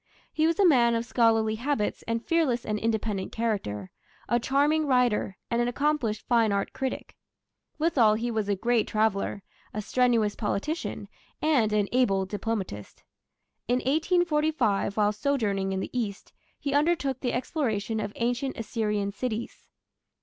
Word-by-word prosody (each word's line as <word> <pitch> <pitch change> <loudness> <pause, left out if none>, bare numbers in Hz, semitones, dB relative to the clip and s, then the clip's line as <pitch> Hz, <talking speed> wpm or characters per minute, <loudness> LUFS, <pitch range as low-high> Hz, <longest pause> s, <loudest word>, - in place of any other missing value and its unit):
He 315 0 +2
was 330 +2 0
a 400 - +6
man 240 -8 +5
of 230 +1 -1
scholarly 225 -2 +2
habits 235 -1 -2
and 230 0 -2
fearless 285 -8 +1
and 210 -1 -1
independent 220 -3 -1
character, 195 - -2 0.4
a 240 - +2
charming 290 +5 +2
writer, 245 -6 +2
and 235 0 +2
an 240 - +1
accomplished 260 -4 0
fine 230 -3 +3
art 200 0 -1
critic; 265 -1 -4 0.6
withal 255 -10 +3
he 235 +2 -2
was 215 -2 -1
a 200 - +2
great 235 +2 +1
traveller, 215 -2 0 0.3
a - - -1
strenuous 230 -3 +2
politician, 265 +10 -3 0.3
and 265 -9 +2
an 210 -1 +2
able 200 -7 +2
diplomatist. 195 - -4 0.6
In 245 - +2
1845, 300 - +1
while 210 -1 +3
sojourning 210 -6 0
in 190 0 -1
the - - -5
East, 210 -5 -4 0.3
he 280 - -2
undertook 290 -3 +1
the 250 -2 -2
exploration 225 -5 -1
of 205 - -3
ancient 245 +3 -1
Assyrian 210 -2 -1
cities. 225 +1 -5
230 Hz, 145 wpm, -27 LUFS, 210-270 Hz, 0.6 s, a